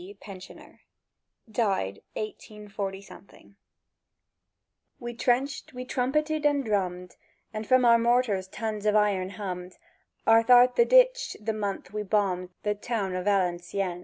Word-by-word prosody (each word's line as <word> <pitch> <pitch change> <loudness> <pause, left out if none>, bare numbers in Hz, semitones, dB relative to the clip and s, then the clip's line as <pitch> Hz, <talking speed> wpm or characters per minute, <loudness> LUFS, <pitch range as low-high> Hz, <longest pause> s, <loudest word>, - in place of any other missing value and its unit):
(PENSIONER). 190 -2 -12 0.7
DIED 195 - -1
184– 200 -2 -8 1.5
WE 240 -2 -6
trenched, 255 +5 -1
we 250 0 -6
trumpeted 305 +5 -1
and 290 -2 +2
drummed, 180 -4 -2 0.4
And 215 0 -5
from 255 -1 +4
our 235 -1 +6
mortars 230 -5 +1
tons 215 +1 -4
of 210 - +3
iron 200 -3 +2
hummed 185 -3 -7 0.5
Ath'art 245 +2 +6
the 475 - +5
ditch, - - +4
the 220 +1 -2
month 200 -3 -4
we 210 - -2
bombed 190 -3 0
The 210 - +1
Town 205 -3 -3
o' 185 - -3
Valencieën. 180 -1 -1
210 Hz, 120 wpm, -27 LUFS, 190-245 Hz, 1.5 s, our